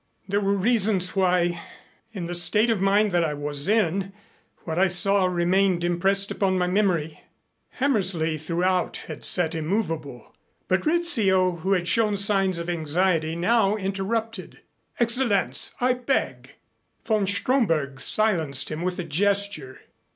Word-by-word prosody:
"There 200 +1 0
were 200 0 +1
reasons 200 -3 +1
why, 180 -2 +1 0.5
in 190 -6 -6
the 175 - -5
state 210 +6 +3
of 210 -4 -1
mind 200 +2 +2
that 175 -1 +1
I 150 -2 -2
was 145 +1 -3
in, 195 -2 0 0.5
what 160 +1 -3
I 190 - +4
saw 190 +2 +2
remained 180 0 +1
impressed 195 +3 +1
upon 190 -2 0
my 180 - +1
memory." 180 -5 -1 0.5
Hammersley 185 - 0
throughout 175 +4 -1
had - - -9
sat 175 -3 +2
immovable. 160 - -4 0.3
But 185 +5 0
Rizzio, 210 - +2
who 190 +4 -1
had 175 -2 -1
shown 210 +1 +2
signs 195 -2 +1
of 170 0 -5
anxiety, 165 0 0
now 205 +3 +1
interrupted. 200 +1 -4 0.4
"Excellenz, 235 -4 +2
I 250 +1 +2
beg 250 +2 -3 0.2
" - - -46
Von 215 -3 0
Stromberg 175 - 0
silenced 165 -11 +1
him 155 +1 -5
with 180 0 -3
a 180 - -3
gesture. 180 -4 -2
190 Hz, 140 wpm, -24 LUFS, 170-205 Hz, 0.5 s, I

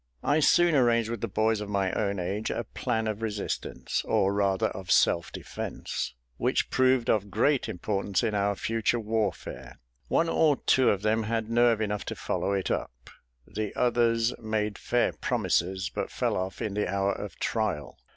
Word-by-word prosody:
I 145 +2 +3
soon 175 +2 +4
arranged 115 -4 +3
with 120 - -4
the 115 - -1
boys 110 +1 +1
of 105 - -5
my 100 -2 0
own 100 -2 -1
age 100 +5 -2
a - - -2
plan 110 0 -2
of 110 0 -3
resistance, 105 -3 -3
or 95 +1 +2
rather 100 -2 +1
of 95 -2 -8
self 85 0 +3
defence, - - -5 0.2
which - - 0
proved 130 -2 +3
of 105 -1 +1
great 125 +7 +1
importance 100 0 -1
in 110 - 0
our 100 0 +1
future 115 +3 0
warfare. 100 - -3 0.3
One 165 - +2
or 160 -2 +3
two 130 -1 +3
of 100 0 0
them 110 +1 +2
had 115 0 -2
nerve 120 -1 +4
enough 105 -1 -2
to - - -4
follow 100 - -2
it 95 -2 -1
up: - - -4 0.3
the 110 -2 -4
others 120 -1 +2
made 110 -2 -2
fair 120 - +1
promises, 95 +3 0
but - - -3
fell - - -1
off 95 +1 -3
in 105 - -2
the 105 -3 -1
hour 100 0 +1
of 105 - -7
trial. 100 - -2
105 Hz, 175 wpm, -28 LUFS, 100-115 Hz, 0.3 s, soon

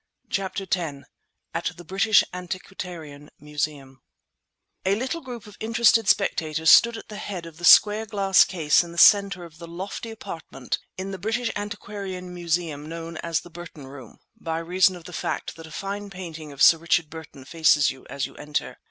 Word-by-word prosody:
CHAPTER 195 0 -2
X 165 -7 -3 0.5
AT 170 +1 -3
THE 175 - -10
BRITISH 195 +5 +4
ANTIQUARIAN 175 -5 -7
MUSEUM 145 -2 -5 0.8
A 190 +1 +2
little 265 +9 -3
group 245 -6 -8
of 210 - -14
interested 225 -1 +3
spectators 160 -5 +2
stood 235 -1 +7
at - - -10
the 210 - -7
head 185 -5 -6
of 165 -2 -11
the 175 - -4
square 215 +3 +7
glass 195 -3 +4
case 160 -3 +2
in 170 -1 -10
the - - -12
centre 200 0 +6
of 165 -2 -13
the 170 - -9
lofty 190 +6 -6
apartment 165 - -6 0.2
in 190 +1 -4
the 190 - -6
British 225 +4 -1
Antiquarian 200 -3 -6
Museum 165 -4 -2
known 165 0 -6
as 165 -1 -1
the 175 - -14
Burton 165 -4 -10
Room 130 -4 -12 0.2
(by 165 -1 -4
reason 180 +3 +2
of 175 - -11
the 180 - -11
fact - - -3
that 165 0 -11
a - - -14
fine 200 +4 -5
painting 165 -5 -8
of 140 - 0
Sir 165 - +8
Richard 170 -1 +1
Burton 155 -4 -10
faces 150 -1 +3
you 130 - -14
as 140 - -2
you - - -11
enter). 150 0 -4
175 Hz, 180 wpm, -25 LUFS, 160-195 Hz, 0.8 s, Sir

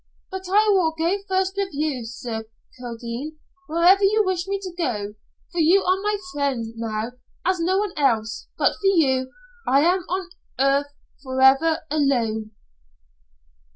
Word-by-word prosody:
But 380 0 -6
I 420 +3 +4
will 330 -4 +2
go 335 +4 +1
first 380 0 +1
with 395 -1 0
you, 285 -5 -1
Sir 225 -1 -5 0.3
Kildene, 240 +5 -6 0.3
wherever 345 +5 +4
you 425 +2 +4
wish 370 -1 -1
me 395 0 -1
to 370 -2 -6
go. 215 - -2 0.4
For 350 - -3
you 345 +5 +5
are 370 +1 +1
my 415 0 0 0.2
friend 275 -5 -1
now, 225 0 -3 0.3
as 370 0 +1
no 365 +3 +1
one 405 -2 -1
else. 230 -6 0
But - - +3
for 400 - 0
you, 265 -8 +2 0.4
I 275 +2 +4
am 355 +4 +3
on 370 0 -3 0.3
earth 275 +1 +3 0.3
forever 270 +5 +3
alone." 235 -8 +1
310 Hz, 150 wpm, -23 LUFS, 255-375 Hz, 0.4 s, you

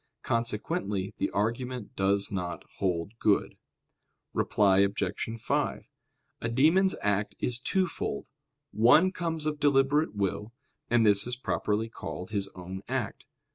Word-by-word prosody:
Consequently 105 -4 -1
the - - 0
argument 120 +3 -2
does 100 +1 +1
not 90 -3 -3 0.2
hold 90 -1 0
good. 105 -2 +2 0.8
Reply 95 -2 +3
Obj. 100 +3 0
5: - - -1 0.5
A 115 - -1
demon's 165 +10 +4
act 100 0 0
is 125 -1 -1
twofold. 185 +7 -1 0.5
One 150 +12 +5
comes 165 -4 -2
of 150 -1 -1
deliberate 145 -1 +3
will; 100 +2 -2 0.4
and 120 -1 +4
this 105 +1 +4
is 125 - -2
properly 110 -3 -1
called 90 -4 -7
his 100 -2 -1
own 95 +1 -7
act. - - -3
110 Hz, 125 wpm, -29 LUFS, 100-130 Hz, 0.8 s, One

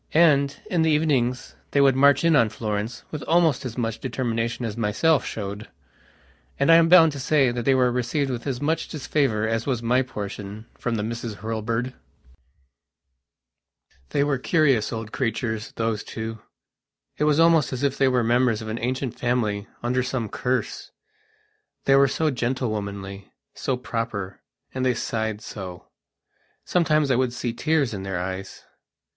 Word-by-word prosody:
And, 140 -4 +4
in 175 -3 +1
the 160 - +3
evenings, 135 -5 +1
they 140 - +1
would 135 -2 +5
march 140 +3 +5
in 165 -1 +4
on 115 -5 +4
Florence 110 +2 -4
with 150 - -5
almost 160 -5 +3
as 120 -1 -6
much 115 -2 -2
determination 115 -2 -2
as 110 -2 -4
I - - -7
myself 125 +8 +2
showed. 100 0 -5 0.9
And 140 +4 +4
I 165 - +9
am 165 0 +4
bound 165 -3 +8
to 140 - -7
say 135 -1 +3
that 120 -1 -4
they 135 - +4
were 125 -1 +3
received 125 +3 -1
with 120 +2 -5
as 130 -3 -2
much 155 +3 -1
disfavour 135 -7 0
as 115 +2 -1
was 125 -4 -1
my 125 +3 +3
portionfrom 105 0 -5
the 105 - -2
Misses 115 0 -4
Hurlbird.... 115 +3 -3 2.2
They 140 - +1
were 145 -3 0
curious 140 -7 +2
old 110 -1 -5
creatures, 115 -3 -2
those 115 -2 -1
two. 110 0 -6 0.8
It 150 - +1
was 150 0 +3
almost 165 -2 +4
as 130 +1 -4
if 140 -2 +1
they 135 - +4
were 125 -2 +2
members 120 -1 +2
of 110 - -6
an 110 +2 -3
ancient 130 +1 -3
family 110 -4 0 0.2
under 125 +2 +1
some 125 -3 -3
cursethey 125 +4 -2 1.0
were 135 0 +6
so 155 +3 0
gentlewomanly, 105 -6 -3 0.2
so 130 - -2
proper, 115 -6 -4 0.3
and 130 - -2
they 125 -1 +2
sighed 110 -1 -2
so. 95 -5 -8 0.8
Sometimes 155 -5 +2
I - - +4
would 125 -1 +1
see 120 -1 -3
tears 150 -5 +1
in 100 - -4
their 95 -2 -3
eyes. 95 +1 -6
125 Hz, 165 wpm, -24 LUFS, 110-140 Hz, 2.2 s, I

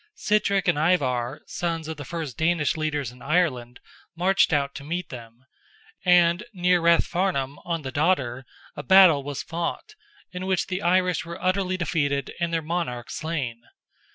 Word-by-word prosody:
Sitrick 200 -2 +1
and 145 - +2
Ivar, 140 -5 0
sons 165 -2 -3
of 160 - -4
the 145 - -6
first 155 -4 -5
Danish 160 -2 +1
leaders 150 -5 -2
in 125 0 -17
Ireland, 135 -7 0 0.4
marched 185 +3 +3
out 140 -2 +1
to 140 - -8
meet 170 +4 -4
them, 120 0 -11 0.6
and 175 -1 +4
near 180 -1 +2
Rathfarnham, 170 -4 +1
on 165 -2 -2
the 130 - -5
Dodder, 135 -5 0 0.3
a - - -5
battle 190 -6 +6
was 140 0 -5
fought, 170 - -4 0.4
in 180 +1 -5
which 190 -1 +1
the 185 0 -4
Irish 180 -2 +2
were 170 +1 -8
utterly 185 0 0
defeated 145 -6 -1
and 170 -1 -1
their 165 -1 -1
monarch 155 -8 -3
slain. 140 -8 -4
165 Hz, 155 wpm, -25 LUFS, 140-180 Hz, 0.6 s, battle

